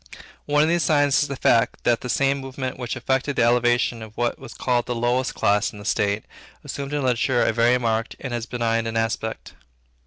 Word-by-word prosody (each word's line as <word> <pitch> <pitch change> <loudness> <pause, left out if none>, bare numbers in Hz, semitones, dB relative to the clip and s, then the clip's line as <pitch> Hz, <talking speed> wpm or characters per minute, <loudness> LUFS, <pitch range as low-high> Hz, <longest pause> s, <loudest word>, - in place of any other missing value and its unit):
One 150 +1 +3
of - - +2
these 170 +1 +2
signs 145 -3 +3
is 145 - 0
the 140 - -4
fact, 115 -3 +2
that 120 -1 +2
the 125 - -6
same 140 +2 +1
movement 130 -1 -5
which 120 0 -4
effected 130 +3 -1
the - - +3
elevation 120 0 +2
of 110 -1 -11
what 120 0 -1
was 135 -3 -11
called 120 -2 0
the 120 - -2
lowest 120 +2 0
class 105 0 +2
in - - -12
the 100 - -10
state, 100 -1 0 0.4
assumed 140 0 -5
in 145 -1 -1
literature 125 0 +2
a - - +1
very 120 +2 +3
marked 115 -2 -1
and 130 -3 -5
as 120 -1 -3
benign 115 -2 -1
an 115 0 -2
aspect. 115 0 -3
120 Hz, 215 wpm, -23 LUFS, 115-135 Hz, 0.4 s, One